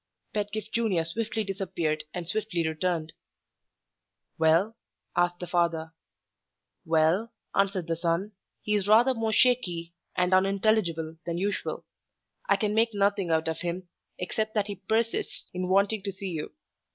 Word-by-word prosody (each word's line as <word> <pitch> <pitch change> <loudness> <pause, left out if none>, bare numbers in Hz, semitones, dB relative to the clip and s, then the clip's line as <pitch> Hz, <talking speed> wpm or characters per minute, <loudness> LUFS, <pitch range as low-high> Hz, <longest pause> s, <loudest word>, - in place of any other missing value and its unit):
Pedgift 210 0 -3
Junior 215 -8 +2
swiftly 220 +5 -2
disappeared 175 -6 -2
and 175 +1 -4
swiftly 180 -3 -1
returned. 160 0 -1 1.3
"Well?" 165 +7 +4 0.4
asked 175 0 +2
the 180 - -4
father. 165 -2 0 0.9
"Well," 165 +8 +3 0.2
answered 195 -3 +1
the 165 0 -1
son, 170 +5 0 0.3
"he 210 - 0
is 205 -2 +1
rather 235 +5 +6
more 225 -2 -1
shaky 180 -9 +2 0.2
and 180 +1 +2
unintelligible 185 -4 +2
than 170 0 -1
usual. 200 +3 -2 0.6
I - - +6
can 210 -2 0
make 225 0 +2
nothing 200 -2 +2
out 160 0 +2
of 160 - -2
him, 175 +1 -3 0.3
except 215 +4 -2
that 210 -2 +2
he 205 -2 -6
persists 225 +4 -1
in 180 0 -2
wanting 200 +2 +3
to 200 0 -3
see 190 0 -5
you. 155 -3 -4
190 Hz, 140 wpm, -28 LUFS, 170-215 Hz, 1.3 s, rather